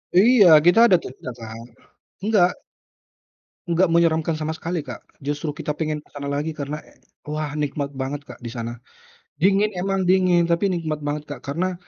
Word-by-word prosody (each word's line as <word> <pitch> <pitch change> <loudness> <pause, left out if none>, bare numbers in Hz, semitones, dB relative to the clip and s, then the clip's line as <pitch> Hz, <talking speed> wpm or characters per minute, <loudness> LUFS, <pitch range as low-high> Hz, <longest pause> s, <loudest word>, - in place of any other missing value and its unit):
Iya, 220 +2 +6 0.2
kita 180 +6 +6
ada 190 - +6
tuh - - -7
dibelakang. 115 -3 -9 0.6
Enggak. 205 -4 +4 1.2
Enggak 170 +1 +2
menyeramkan 165 -1 +2
sama 155 +1 -3
sekali, 170 +2 -3
Kak. 130 -5 -8 0.2
Justru 145 +2 -3
kita 150 0 -4
pengen 155 -1 -2
ke 150 - -21
sana 140 0 -4
lagi 150 +2 -2
karena, 150 +1 -4 0.5
wah, 150 0 -3
nikmat 145 -1 -3
banget, 135 +1 -4
Kak, - - -12
di 120 - -7
sana. 115 0 -6 0.6
Dingin 200 +3 +3
memang 190 +1 -1
dingin, 180 -2 +4
tapi 170 +4 +1
nikmat 160 -4 -2
banget, 145 0 -3
Kak. 145 -4 -7
Karena 170 +8 -2
155 Hz, 160 wpm, -22 LUFS, 145-180 Hz, 1.2 s, Iya